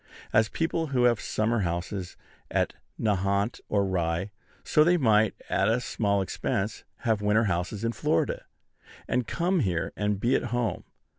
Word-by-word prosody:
As 110 Hz, 0 st, +4 dB
people 165 Hz, +2 st, -1 dB
now 130 Hz, -3 st, +1 dB
have 120 Hz, -3 st, +3 dB
summer 110 Hz, +2 st, 0 dB
houses 90 Hz, +1 st, -3 dB, 0.3 s
at -, -, 0 dB, 0.3 s
Nahant 100 Hz, +1 st, 0 dB
or 100 Hz, -1 st, +2 dB
Rye, 90 Hz, +1 st, -1 dB, 0.3 s
so 150 Hz, -, +4 dB
they 175 Hz, +2 st, +4 dB
might, 110 Hz, -, +3 dB
at 100 Hz, +3 st, +2 dB
a 115 Hz, +2 st, +2 dB
small 100 Hz, -4 st, 0 dB
expense, 95 Hz, +3 st, -2 dB, 0.2 s
have 110 Hz, -5 st, +1 dB
winter 105 Hz, +2 st, +3 dB
houses 100 Hz, +1 st, -1 dB
in 115 Hz, -, +1 dB
Florida, -, -, 0 dB, 0.6 s
and 125 Hz, -1 st, 0 dB
come 180 Hz, +2 st, +1 dB
here 90 Hz, -, -1 dB
and 105 Hz, -1 st, 0 dB
be 120 Hz, +5 st, +2 dB
at -, -, 0 dB
home. 120 Hz, -4 st, -2 dB
105 Hz, 155 wpm, -27 LUFS, 95-120 Hz, 0.6 s, As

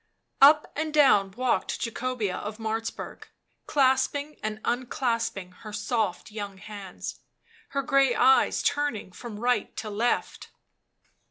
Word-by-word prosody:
Up 300 Hz, +2 st, +7 dB
and 315 Hz, +1 st, -2 dB
down 270 Hz, -10 st, +5 dB
walked 250 Hz, +2 st, 0 dB
Jacobea 230 Hz, -4 st, -2 dB
of 210 Hz, +2 st, -5 dB
Martzburg, 225 Hz, 0 st, -4 dB, 0.4 s
clasping 280 Hz, +2 st, +2 dB
and 215 Hz, 0 st, -3 dB
unclasping 230 Hz, -6 st, -1 dB
her 215 Hz, -, -9 dB
soft 210 Hz, -2 st, -2 dB
young 205 Hz, -2 st, -6 dB
hands, 195 Hz, -2 st, -8 dB, 0.5 s
her 275 Hz, 0 st, -1 dB
grey 270 Hz, -2 st, +3 dB
eyes 260 Hz, +2 st, +4 dB
turning 285 Hz, -9 st, -1 dB
from 210 Hz, +3 st, -8 dB
right 245 Hz, +2 st, 0 dB
to 215 Hz, -, -4 dB
left. 230 Hz, +4 st, -1 dB
235 Hz, 115 wpm, -27 LUFS, 210-265 Hz, 0.5 s, Up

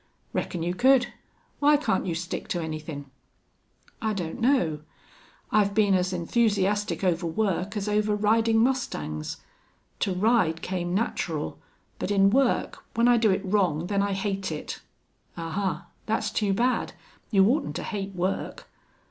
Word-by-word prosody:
"Reckon 170 Hz, -2 st, -2 dB
you 175 Hz, +1 st, -1 dB
could. 245 Hz, +3 st, +4 dB, 0.5 s
Why 295 Hz, +1 st, +5 dB
can't 190 Hz, -10 st, 0 dB
you 170 Hz, -, -1 dB
stick 175 Hz, +2 st, -4 dB
to 175 Hz, -, -1 dB
anythin'?" 155 Hz, -3 st, -5 dB, 1.0 s
"I 220 Hz, -1 st, 0 dB
don't 175 Hz, -5 st, -4 dB
know. 230 Hz, -, +2 dB, 0.7 s
I've 200 Hz, -2 st, +3 dB
been 205 Hz, -2 st, +4 dB
as 185 Hz, 0 st, +2 dB
enthusiastic 205 Hz, +2 st, +1 dB
over 175 Hz, -2 st, +1 dB
work 195 Hz, +2 st, -1 dB
as 205 Hz, 0 st, -2 dB
over 210 Hz, 0 st, +1 dB
riding 225 Hz, +2 st, +3 dB
mustangs. 75 Hz, -, -2 dB, 0.6 s
To 195 Hz, -, 0 dB
ride 185 Hz, -6 st, +2 dB
came 180 Hz, -1 st, -2 dB
natural, 165 Hz, -, -2 dB, 0.4 s
but -, -, -2 dB
in 195 Hz, -1 st, +4 dB
work, 265 Hz, +1 st, +1 dB
when 230 Hz, +1 st, +4 dB
I 245 Hz, -1 st, +6 dB
do 225 Hz, -2 st, +3 dB
it 190 Hz, -, 0 dB
wrong, 185 Hz, -5 st, +1 dB
then 200 Hz, +1 st, 0 dB
I 200 Hz, 0 st, 0 dB
hate 195 Hz, -2 st, -2 dB
it." 150 Hz, -, -5 dB, 0.6 s
"Ahuh! 170 Hz, 0 st, -2 dB, 0.2 s
That's 220 Hz, 0 st, 0 dB
too 205 Hz, -2 st, 0 dB
bad. 245 Hz, +6 st, +1 dB, 0.4 s
You 195 Hz, -3 st, +5 dB
oughtn't 280 Hz, +7 st, +1 dB
to -, -, -3 dB
hate 195 Hz, -3 st, -4 dB
work. 185 Hz, +2 st, -3 dB
195 Hz, 150 wpm, -26 LUFS, 175-220 Hz, 1.0 s, I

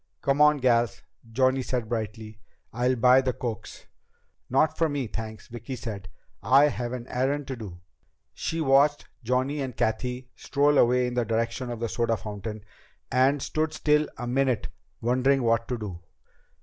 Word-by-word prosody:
"Come 140 Hz, +1 st, +2 dB
on, 150 Hz, 0 st, +6 dB
gals," 120 Hz, -3 st, +1 dB, 0.3 s
Johnny 130 Hz, +2 st, +2 dB
said 125 Hz, -3 st, -2 dB
brightly. 110 Hz, -1 st, -5 dB, 0.3 s
"I'll 125 Hz, +2 st, +1 dB
buy 125 Hz, +2 st, +5 dB
the 130 Hz, -1 st, -1 dB
cokes." 115 Hz, -3 st, -6 dB, 0.6 s
"Not 155 Hz, +5 st, +2 dB
for 165 Hz, -1 st, +1 dB
me, 145 Hz, -3 st, -2 dB
thanks," 110 Hz, 0 st, -7 dB
Vicki 120 Hz, +2 st, -7 dB
said. 105 Hz, -6 st, -7 dB, 0.3 s
"I 140 Hz, +3 st, +5 dB
have 120 Hz, -3 st, -4 dB
an 125 Hz, -2 st, -5 dB
errand 135 Hz, +3 st, -1 dB
to 130 Hz, -, -3 dB
do." 95 Hz, -7 st, -9 dB, 0.5 s
She 165 Hz, 0 st, -3 dB
watched 145 Hz, +1 st, +3 dB, 0.2 s
Johnny 130 Hz, +5 st, 0 dB
and 130 Hz, -3 st, -5 dB
Cathy 125 Hz, +3 st, -2 dB
stroll 145 Hz, +1 st, +2 dB
away 125 Hz, +1 st, +4 dB
in 125 Hz, -, -3 dB
the 120 Hz, -1 st, +1 dB
direction 115 Hz, +2 st, -2 dB
of 120 Hz, -2 st, -5 dB
the 115 Hz, -, 0 dB
soda 115 Hz, 0 st, 0 dB
fountain, 105 Hz, +1 st, -7 dB, 0.5 s
and 130 Hz, +2 st, +3 dB
stood 155 Hz, 0 st, -1 dB
still 150 Hz, 0 st, +2 dB
a 120 Hz, -, -5 dB
minute 130 Hz, -1 st, 0 dB, 0.3 s
wondering 130 Hz, +3 st, +2 dB
what 115 Hz, 0 st, +1 dB
to 125 Hz, -, -2 dB
do. 100 Hz, -6 st, -7 dB
125 Hz, 160 wpm, -26 LUFS, 115-135 Hz, 0.6 s, on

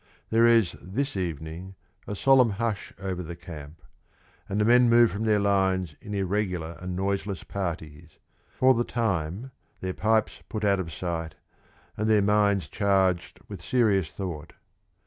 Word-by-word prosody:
There 115 Hz, +1 st, +5 dB
is 115 Hz, -7 st, +4 dB
this 135 Hz, +9 st, -3 dB
evening 85 Hz, +1 st, -5 dB, 0.3 s
a 105 Hz, -, -4 dB
solemn 130 Hz, +2 st, +5 dB
hush 110 Hz, 0 st, -3 dB
over 95 Hz, -2 st, -4 dB
the 85 Hz, 0 st, -7 dB
camp, 80 Hz, -3 st, -11 dB, 0.7 s
and 100 Hz, -, -1 dB
the 105 Hz, -, +3 dB
men 120 Hz, +1 st, +5 dB
move 120 Hz, 0 st, +6 dB
from 105 Hz, +3 st, -3 dB
their 110 Hz, -1 st, +3 dB
lines 95 Hz, -4 st, +1 dB
in 105 Hz, -, -6 dB
irregular 90 Hz, -4 st, -2 dB
and 90 Hz, 0 st, -5 dB
noiseless 100 Hz, -1 st, -2 dB
parties, 80 Hz, -4 st, -6 dB, 0.4 s
for 130 Hz, 0 st, +5 dB
the 120 Hz, -1 st, +1 dB
time 105 Hz, 0 st, -2 dB, 0.3 s
their 95 Hz, 0 st, -3 dB
pipes 110 Hz, +2 st, +1 dB
put 110 Hz, -2 st, -3 dB
out 100 Hz, -1 st, +3 dB
of 85 Hz, -3 st, -4 dB
sight, 80 Hz, -2 st, -4 dB, 0.6 s
and 110 Hz, +1 st, 0 dB
their 105 Hz, -2 st, +4 dB
minds 100 Hz, -2 st, +2 dB
charged 95 Hz, -3 st, +1 dB
with 100 Hz, -6 st, -8 dB
serious 100 Hz, -5 st, +2 dB
thought. 80 Hz, -3 st, -6 dB
95 Hz, 150 wpm, -26 LUFS, 85-110 Hz, 0.7 s, move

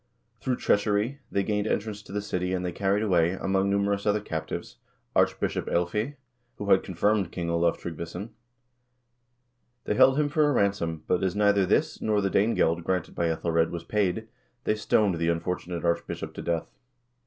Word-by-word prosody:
Through 130 Hz, -, 0 dB
treachery 105 Hz, +5 st, +1 dB
they 100 Hz, -, +1 dB
gained 105 Hz, +1 st, -1 dB
entrance 105 Hz, -1 st, -2 dB
to 105 Hz, -, -14 dB
the 105 Hz, 0 st, -2 dB
city 90 Hz, -2 st, -1 dB
and 90 Hz, 0 st, -2 dB
they 90 Hz, -, -1 dB
carried 100 Hz, +3 st, 0 dB
away, 90 Hz, -4 st, +3 dB
among 95 Hz, +1 st, 0 dB
numerous 100 Hz, +1 st, 0 dB
other 105 Hz, +1 st, +3 dB
captives, 80 Hz, -6 st, -5 dB, 0.4 s
Archbishop -, -, +1 dB
iElfeah, 105 Hz, +11 st, 0 dB, 0.4 s
who 100 Hz, -1 st, -3 dB
had 95 Hz, -, +6 dB
con 95 Hz, -, -7 dB
firmed 100 Hz, 0 st, +2 dB
King 85 Hz, -2 st, -3 dB
Olav 85 Hz, 0 st, +2 dB
Tryggvason. 85 Hz, +5 st, -6 dB, 1.5 s
They -, -, 0 dB
held 130 Hz, +6 st, +5 dB
him 150 Hz, -, +3 dB
for 150 Hz, 0 st, +2 dB
a -, -, +2 dB
ransom, 90 Hz, -8 st, 0 dB
but 90 Hz, -, +1 dB
as 95 Hz, 0 st, 0 dB
neither 100 Hz, -2 st, +3 dB
this, -, -, +1 dB
nor 105 Hz, -1 st, +2 dB
the 95 Hz, -1 st, 0 dB
Danegeld 85 Hz, -5 st, +2 dB
granted 90 Hz, -1 st, -1 dB
by 85 Hz, -, 0 dB
^Ethelred, 80 Hz, 0 st, +1 dB
was 85 Hz, -1 st, -5 dB
paid, 105 Hz, +3 st, 0 dB, 0.4 s
they -, -, +2 dB
stoned 105 Hz, -4 st, +2 dB
the 85 Hz, 0 st, +1 dB
unfortunate 85 Hz, 0 st, -2 dB
archbishop 85 Hz, 0 st, -2 dB
to -, -, -6 dB
death. 85 Hz, -1 st, -2 dB
95 Hz, 175 wpm, -27 LUFS, 85-105 Hz, 1.5 s, had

